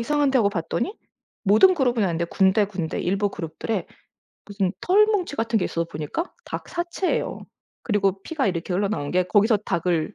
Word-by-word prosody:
이상한데.' 285 +2 +2
하고 210 -4 +4
봤더니 200 - -3 0.5
모든 220 - +6
그룹은 250 -7 +1
아닌데 170 -3 0
군데 190 +4 +3
군데 180 -5 -4
일부 200 +3 0
그룹들에 180 +5 -4 0.6
무슨 200 -2 -1
털뭉치 405 -3 +3
같은 230 -2 0
게 185 - -1
있어서 170 - -1
보니까 165 - -5
닭 - - -6
사체예요. 345 +2 -2 0.4
그리고 195 -3 0
피가 300 0 -1
이렇게 180 -1 -2
흘러나오는 195 -5 -1
게 180 0 +2
거기서 210 +4 +3
닭을 170 -2 0
205 Hz, 385 characters per minute, -24 LUFS, 180-265 Hz, 0.6 s, 모든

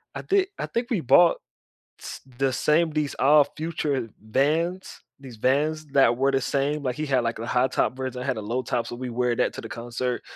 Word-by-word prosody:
I - - -5
thi 390 -1 +2
I - - -1
think 235 +2 -3
we 215 -8 0
bought 170 +6 +5 0.6
s - - -8 0.2
the 135 -1 +2
same 160 +5 +2
these 150 -2 -2
Odd 145 +1 +5
Future 150 -6 -2
Vans, 155 - -1 0.2
these 130 -4 -11
Vans 150 +6 0
that 135 -4 +3
were 135 +1 +2
the 135 0 +1
same 140 +3 -1
like, 125 -2 -2
he 155 - -3
had, 130 -4 +1
like, 115 0 -2
a 115 - -4
high 125 +2 +2
top 130 - 0
version, 130 -1 -4
I - - -5
had 130 -4 -1
a - - -4
low 120 +5 -2
top, 120 -1 -2
so - - -6
we 125 +1 -5
wear 120 0 0
that - - +1
to - - -7
the - - -9
concert 120 +1 -4
135 Hz, 225 wpm, -25 LUFS, 125-150 Hz, 0.6 s, bought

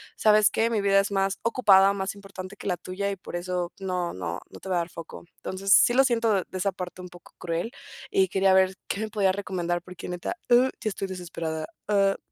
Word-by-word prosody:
¿sabes 215 -1 +5
qué? 225 +1 +1
Mi 225 -2 0
vida 195 0 +4
es 200 - -4
más 195 0 0
ocupada, 200 -5 +5
más 195 0 -3
importante 195 -1 -9
que - - -8
la 180 -2 0
tuya 200 +2 -3
y 195 - -5
por 180 - -9
eso 175 0 -3
no 180 -2 -2
no 85 -1 -4
no - - -12
te 190 - -8
voy 185 - +1
a - - +3
dar 170 - -5
foco. 165 0 -10
Entonces, 195 +1 0
sí 240 - +6
lo 270 +1 +5
siento 230 -3 +2
de 190 - 0
esa 195 +1 0
parte 180 0 -7
un 180 - -9
poco 175 0 -16
cruel 170 +6 -3 0.4
y 385 -1 +3
quería 190 0 +3
ver 190 0 +4
qué 200 - -2
me 220 - -3
podría 200 -3 +2
recomendar 175 -3 -2
porque 180 0 -10
neta, 180 - -4
uh, 250 +2 +6
ya 215 - 0
estoy 195 0 -4
desesperada, 165 -3 -4 0.2
ah. 195 -1 +3
190 Hz, 230 wpm, -26 LUFS, 180-205 Hz, 0.4 s, sí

